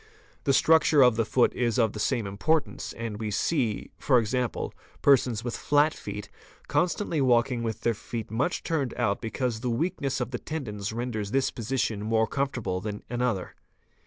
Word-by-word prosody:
| - - -31
_ - - -34
The 140 - +3
structure 160 -1 +5
of 125 -2 +5
the 115 0 +1
foot 125 - +3
is 120 -1 0
of 115 -4 +2
the 105 - -6
same 110 +1 0
importance 145 +11 -1
and 115 -2 -5
we 110 -1 -2
see, 115 0 0
¢.9., 125 -2 +1 0.3
persons 125 -5 +4
with 120 -1 -3
flat 150 +2 +3
feet 105 0 -7 0.4
constantly 175 -3 0
walking 120 -1 +3
with 110 -1 -3
their 115 - +2
feet 115 0 -6
much 130 +10 -1
turned 145 -7 -1
out 110 -5 0
because 120 0 -2
the 125 +1 -2
weakness 135 +1 -1
of 125 -1 -3
the 125 - -3
tendons 105 -10 -4
renders 110 -3 -3
this 135 +4 +1
position 115 -3 -2
more 110 +1 +2
comfort 135 -1 -2
'able 90 -2 -2
than 105 0 -5
another. 120 -6 -1
120 Hz, 180 wpm, -27 LUFS, 110-135 Hz, 0.4 s, structure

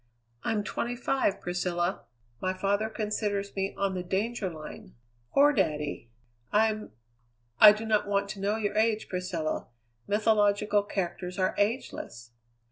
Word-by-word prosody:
I'm 210 -2 0
twenty 240 +3 -3
five, 245 -4 0
Priscilla. 175 0 -2 0.4
My 185 - 0
father 200 +3 0
considers 210 -2 -2
me 195 0 -2
on 195 -1 0
the 185 - -2
danger 195 +3 -1
line. 155 -3 -10 0.4
Poor 290 +1 +5
daddy!" 150 - -1 0.4
"I'm 215 - +1 0.3
" 115 0 -42
"I 210 - +12
do 215 +2 -3
not 215 -2 +2
want 200 0 +1
to 200 - -6
know 200 +2 0
your 210 -2 -2
age, 220 0 +1
Priscilla. 180 -4 -2 0.4
Mythological 210 -1 +3
characters 180 -2 -4
are 185 -1 +1
ageless." 205 - -2
200 Hz, 135 wpm, -29 LUFS, 180-215 Hz, 0.4 s, I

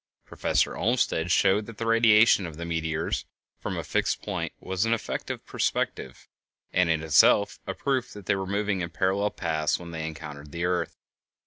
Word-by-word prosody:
Professor - - 0
Olmsted 110 -7 +1
showed 100 +4 +3
that 115 -2 -10
the 115 - -3
radiation 115 -4 +5
of 80 -2 -9
the 85 - -5
meteors 80 -1 -2 0.3
from - - -4
a - - -3
fixed - - -1
point - - -3
was 95 +1 -2
an 115 0 +2
effect 115 - -5
of - - -5
perspective, - - -2 0.5
and 90 -2 +3
in 80 -1 +1
itself 80 +6 +4
a 95 - -3
proof 135 -3 -1
that 105 -2 -11
they - - +2
were 95 -1 -3
moving 100 -1 -1
in 85 - -3
parallel 95 +3 +1
paths 80 -6 -1
when 85 -1 -9
they 80 -1 -4
encountered 75 -2 -8
the 85 +2 -2
earth. 90 0 -1
95 Hz, 185 wpm, -27 LUFS, 80-105 Hz, 0.5 s, radiation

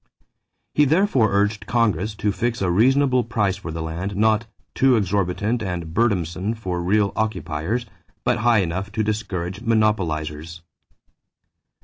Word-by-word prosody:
He 150 - +4
therefore 145 - +3
urged 105 +1 0
Congress 105 -4 +1
to 105 +1 0
fix 120 +3 -2
a 90 - +1
reasonable 130 +5 +3
price 105 -4 0
for 90 -4 -7
the 80 0 -4
land, 85 +5 -4
not 110 +2 +2 0.3
"too 135 -1 +4
exorbitant 100 +3 0
and 90 -5 -4
burdensome 100 -1 0
for 90 -5 -3
real 100 +3 +1
occupiers, 110 +1 -2 0.4
but 120 -1 +1
high 115 -3 +3
enough 95 +4 -4
to 110 0 0
discourage 100 -3 -3
monopolizers." 85 -8 -1
105 Hz, 130 wpm, -22 LUFS, 90-115 Hz, 0.4 s, He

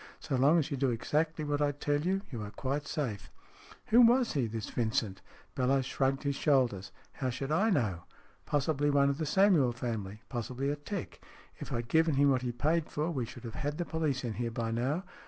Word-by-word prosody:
So 150 -4 -3
long 140 +6 +5
as 155 -3 0
you 140 - -1
do 135 0 +2
exactly 150 +7 -1
what 145 0 -1
I 145 0 +2
tell 145 +1 -1
you, 190 +4 0
you 120 -4 -5
are 105 - -5
quite 140 +6 -3
safe." 125 -11 -3 0.3
" - - -21
Who 235 +3 +7
was 240 +1 +5
he, 130 -5 +1
this 110 -1 -5
Vincent? 110 -4 -1 0.2
" - - -27
Bellowes 130 +1 +2
shrugged 135 +1 0
his 140 -1 0
shoulders. 125 - +1
" - - -31
How 130 - 0
should 135 +3 -4
I 200 +8 +3
know? 105 - 0 0.4
Possibly 145 0 +1
one 140 -1 +4
of 140 - -5
the 155 - -1
Samuel 170 -8 +4
family. 110 -3 -5
Possibly 130 +3 -3
a - - -1
'tec. 170 +6 -6 0.4
If - - -7
I - - -1
had - - -18
given 160 +1 +3
him 140 +1 +4
what 130 -1 +2
he 125 - -3
had 120 0 -4
paid 155 +4 +1
for, 155 +3 -2
we 130 -7 -2
should - - -11
have 115 -2 -6
had 145 +1 -3
the 175 - -2
police 155 -6 -1
in 120 -3 -2
here 120 +1 -2
by 115 0 -3
now. 130 +10 -1
140 Hz, 230 wpm, -31 LUFS, 120-150 Hz, 0.4 s, Who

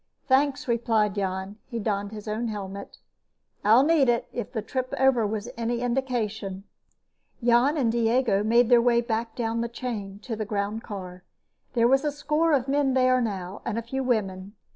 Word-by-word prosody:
"Thanks," 280 +1 +2
replied 225 -3 +1
Jan. 190 +1 -3
He 235 - -5
donned 205 -2 -2
his 215 0 -9
own 220 +3 -2
helmet. 200 -2 -6 0.7
"I'll 225 +5 +6
need 295 -4 +4
it, 235 -1 +1
if 240 -4 -4
the 220 -4 -3
trip 255 -1 -3
over 260 -5 +3
was 215 +1 -4
any 235 0 -2
indication." 225 -6 -2 0.8
Jan 245 +6 +4
and 245 -6 +2
Diego 230 -3 +2
made 235 +2 +4
their 240 -1 +6
way 235 0 +3
back 225 -1 -3
down 230 -1 -1
the 235 - -2
chain 215 -5 -5
to 235 - -4
the 215 - -3
groundcar. 200 -3 -4 0.5
There 235 -2 +4
was 270 +3 +3
a 300 - 0
score 300 +3 0
of 270 -3 +2
men 275 -1 +1
there 255 -1 +4
now, 195 -4 -4
and 225 - -3
a 230 - -2
few 265 +4 -3
women. 200 -5 -2
230 Hz, 175 wpm, -26 LUFS, 210-255 Hz, 0.8 s, I'll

